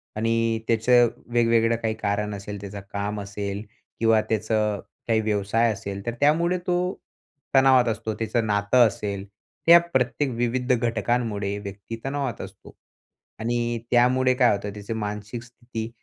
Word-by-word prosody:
आणि 115 +1 +1
त्याचं 120 +1 +4 0.3
वेगवेगळं 115 -1 +3
काही 115 -1 -2
कारण 105 0 -2
असेल. 100 +1 -7
त्याचं 100 0 -7
काम 100 +1 -2
असेल 100 +1 -5 0.4
किंवा 115 -1 +4
त्याचं 110 -1 0 0.3
काही 110 -1 +2
व्यवसाय 110 +2 +1
असेल. 100 -1 -7
तर 120 - -2
त्यामुळे 170 +5 +3
तो 175 0 +2 0.8
तणावात 130 -2 +6
असतो. 110 -1 -2
त्याचं 115 +1 -1
नातं 105 +4 +4
असेल. 100 -1 -4 0.4
ह्या 170 +1 +10
प्रत्येक 130 +2 +1
विविध 125 +2 0
घटकांमुळे 115 -3 -1
व्यक्ती 100 +3 -7
तणावात 135 -4 -2
असतो - - -11 0.6
आणि 120 +1 -1
त्यामुळे 130 +1 +4
काय 125 -2 +4
होतं, 100 0 -5
त्याची 105 +2 -6
मानसिक 105 +1 -5
स्थिती 120 -1 -7
115 Hz, 135 wpm, -24 LUFS, 105-120 Hz, 0.8 s, ह्या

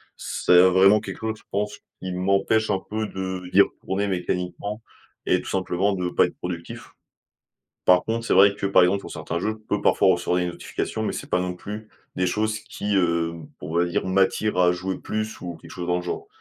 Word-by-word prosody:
C'est, - - 0
heu, 90 +1 +8
vraiment 95 +3 +6
quelque - - -7
chose 110 0 -2
je - - -22
pense 105 +1 -2 0.2
qui 95 0 -4
m'empêche 100 +4 +1
un 95 - +1
peu 110 +1 -2
de 95 -2 -5
d'y 100 - +7
retourner 100 +1 -1
mécaniquement 90 +3 -3 0.4
et - - +2
tout - - -8
simplement 95 +1 0
de 90 -2 -2
pas - - +4
être - - -8
productif. 85 -1 -7 1.0
Par 90 0 +6
contre, 115 +1 -2
c'est - - +2
vrai 100 +1 +7
que, 100 - -2
par 95 - +5
exemple, 95 +3 +3
pour - - -9
certains 85 - -4
jeux, 110 +3 -1
je 110 - -30
peux 105 - 0
parfois - - +4
recevoir 90 +1 0
des 90 - 0
notifications, 85 - -4
mais - - -1
c'est - - -6
pas 90 - +2
non 90 0 -2
plus 105 +4 -8 0.3
des 90 - +1
choses 110 +3 0
qui, 105 0 -4
heu, 85 -2 +1 0.3
on 80 +2 -6
va 85 +1 +3
dire, 85 +1 -1
m'attire 95 +2 +1
à 90 -1 +5
jouer 95 +1 -3
plus 110 0 -4
ou 85 -2 -5
quelque - - -15
chose 85 - -6
dans 90 - +1
le 90 - -3
genre. 90 - -4
95 Hz, 220 wpm, -24 LUFS, 90-105 Hz, 1.0 s, heu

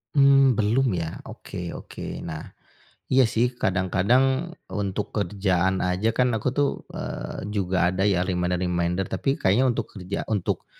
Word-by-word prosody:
Mmm, 135 -3 +5
belum 115 +4 +2
ya? 80 -1 -5
Oke 85 -1 -7
oke. - - -9 0.3
Nah, 80 -1 -5 0.7
iya 130 0 +6
sih, 115 +2 +4 0.2
kadang-kadang 95 +7 +3 0.4
untuk 100 0 -2
kerjaan 95 -2 +1
aja 90 +4 0
kan 125 - +4
aku 110 +3 -1
tuh, 145 -1 +3 0.2
eee, - - -5
juga 95 -2 0
ada 95 +1 -1
ya 100 -3 +3
reminder-reminder, 90 0 0
tapi - - -3
kayaknya 105 +7 +3
untuk 120 - -2
kerja 95 -1 -4 0.2
untuk, 100 - -2
95 Hz, 140 wpm, -25 LUFS, 90-115 Hz, 0.7 s, iya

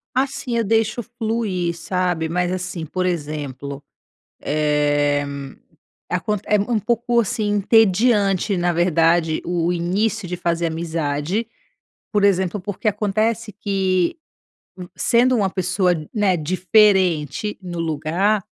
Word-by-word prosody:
Assim, 260 -2 -1
eu 230 - +2
deixo 225 +2 +1
fluir, 220 -7 -2
sabe. 175 -2 -1
Mas 180 +1 0
assim, 180 -3 -4
por 185 +4 -2
exemplo, 145 -4 -4 0.6
eh, 145 -1 +1 0.9
aconte 190 +3 -1
é 210 - +3
um 225 +2 0
pouco, 235 +2 +1
assim, 215 -1 -1
entediante, 205 -1 +3
na 175 0 +1
verdade, 165 -1 +2
o 175 0 0
início 190 +4 -1
de 180 - -3
fazer 170 -1 -1
amizade. 160 +4 -2 0.7
Por 205 -1 +2
exemplo, 190 0 +2
porque 205 +3 -3
acontece 215 +2 -1
que 190 - 0 0.6
v 180 -1 -8
sendo 250 +1 +3
uma 195 -3 +1
pessoa, 185 0 +1 0.2
né, 200 -4 +2
diferente 185 0 +2
no 175 -2 -6
lugar, 165 +6 0
185 Hz, 115 wpm, -21 LUFS, 170-210 Hz, 0.9 s, é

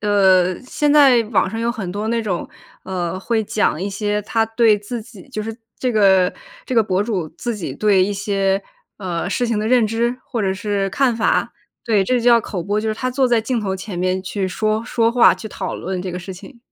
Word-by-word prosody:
呃， 190 -3 +3
现 290 +3 0
在 270 -6 +6
网 195 - +2
上 225 +3 -4
有 235 - 0
很 215 -6 -5
多 210 +2 -3
那 230 0 +1
种， 195 -6 -3 0.3
呃， 180 -1 -3
会 220 +2 -1
讲 205 -5 0
一 195 - -2
些 205 +1 -1
他 225 +2 +1
对 225 -1 +3
自 210 +4 -6
己 220 -1 -14
就 230 -5 -5
是 225 +1 -5 0.2
这 250 -2 -1
个 190 -4 +4 0.3
这 255 - -3
个 225 - +5
博 190 -2 0
主 200 -7 -2
自 240 -2 -2
己 190 -5 -5
对 205 -3 +3
一 205 - -2
些， 195 -1 0 0.4
呃， 180 -2 -3
事 245 - 0
情 230 -2 -1
的 215 +1 -1
认 245 -3 +4
知 235 +3 -1
或 235 -5 -3
者 190 - +1
是 200 -1 -2
看 255 +3 +2
法。 225 - +1 0.3
对， 215 -4 +2
这 250 +6 +1
就 235 - -4
叫 235 -1 +6
口 200 -4 -5
播， 205 +4 -1
就 220 - -2
是 215 - -1
他 255 +3 -2
坐 260 +1 +1
在 235 -2 +3
镜 230 +1 -2
头 190 -2 -2
前 190 0 -7
面 185 +1 0
去 190 0 -3
说 215 +3 -1
说 230 -1 +1
话， 235 -6 +6
去 185 +4 -7
讨 190 -3 -5
论 185 0 -4
这 185 - -4
个 180 - -5
事 185 +1 -8
情。 235 +7 -13
210 Hz, 250 characters per minute, -20 LUFS, 190-230 Hz, 0.4 s, 在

